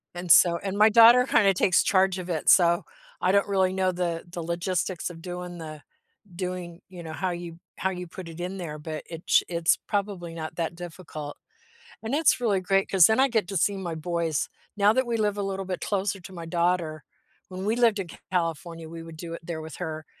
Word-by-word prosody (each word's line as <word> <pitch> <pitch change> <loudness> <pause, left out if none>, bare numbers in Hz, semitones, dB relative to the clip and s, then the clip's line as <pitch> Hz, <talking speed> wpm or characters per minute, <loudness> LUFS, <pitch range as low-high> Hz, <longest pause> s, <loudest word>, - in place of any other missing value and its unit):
And 175 -1 -2
so 170 -1 +7
and 195 +1 -4
my 215 +1 +7
daughter 235 +3 +8
kinda 200 -6 +4
takes 180 0 +3
charge 190 -1 +2
of 180 - -7
it, 160 -3 0
so 170 -1 +5 0.4
I 185 - +3
don't 200 0 +3
really 190 -2 +2
know 185 -1 +1
the 175 -2 -2
the 170 -1 -6
logistics 175 +1 -2
of 165 -2 -11
doing 180 0 -6
the 155 -2 -8 0.5
doing, 180 -1 -5
you 180 -2 -10
know, 160 -1 -7
how 185 +3 -2
you 170 -1 -6 0.2
how 190 - 0
you 180 -1 -6
put 175 +1 -9
it 165 +1 -10
in 180 +2 -4
there, 155 -4 -6
but 155 0 -6
itch 165 0 +2
it's 170 -1 +2
probably 195 -5 -2
not 160 -1 -6
that 170 0 -2
difficult, 160 -4 -8 0.7
and 225 +3 -3
it's 300 -2 +3
really 215 -6 +1
great 195 +1 +1
'cause 185 -4 +7
then 220 +3 +2
I 270 - +5
get 220 -6 0
to 195 - -2
see 200 +4 +2
my 175 -4 -4
boys 165 -1 -1 0.3
now 205 +1 +5
that 260 +2 +1
we 235 -1 0
live 210 -2 0
a - - -1
little 195 0 -3
bit 185 -1 -4
closer 200 -1 -1
to 185 +1 -12
my 170 -2 -7
daughter. 170 -2 0 0.4
When 185 +1 -6
we 215 +2 +1
lived 230 -4 +3
in 185 -3 -4 0.2
California, 165 -2 -2
we 165 0 -8
would 165 -1 -11
do 165 0 -7
it - - -7
there 165 -2 -4
with 160 0 -9
her, 155 -3 -5
180 Hz, 220 wpm, -26 LUFS, 165-195 Hz, 0.7 s, daughter